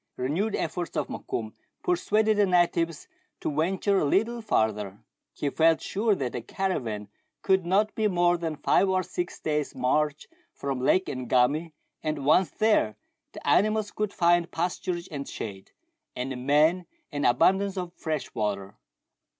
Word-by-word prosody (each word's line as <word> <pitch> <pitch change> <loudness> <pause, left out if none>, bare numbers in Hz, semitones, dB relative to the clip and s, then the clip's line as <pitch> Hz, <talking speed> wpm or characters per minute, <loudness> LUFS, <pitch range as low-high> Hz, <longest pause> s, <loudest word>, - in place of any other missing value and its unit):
Renewed 165 +12 -1
efforts 175 -2 -3
of - - -1
Mokoum 110 -1 -4 0.3
persuaded 210 +4 +2
the 205 -1 +4
natives 170 -3 +1 0.3
to 145 - -3
venture 190 +5 +1
a - - +1
little 225 +10 +1
farther: 105 - 0 0.3
he 145 - -3
felt 165 +2 +4
sure 210 +1 0
that 130 -7 -3
the 120 - -4
caravan 115 - -3 0.4
could 190 -2 +2
not 205 +4 +2
be 220 -1 +1
more 175 -2 +3
than 165 -2 -3
five 195 +6 +2
or 185 0 +2
six 175 0 -4
days' 150 -2 -2
march 150 +3 0 0.3
from 135 -2 -3
Lake 185 +8 +3
Ngami, 130 +6 +1 0.3
and 155 -3 -3
once 170 +5 +4
there, 215 - +2 0.4
the - - -9
animals 215 0 +3
could 210 -1 -2
find 175 -1 +3
pasturage 175 +1 -2
and 140 -2 -5
shade, 95 -3 -7 0.5
and 125 +2 -3
the - - -3
men 150 +7 +2 0.2
an 145 -1 -3
abundance 190 +10 +3
of 180 -2 -4
fresh 155 -5 -4
water. 100 -2 -3
170 Hz, 150 wpm, -27 LUFS, 135-190 Hz, 0.5 s, the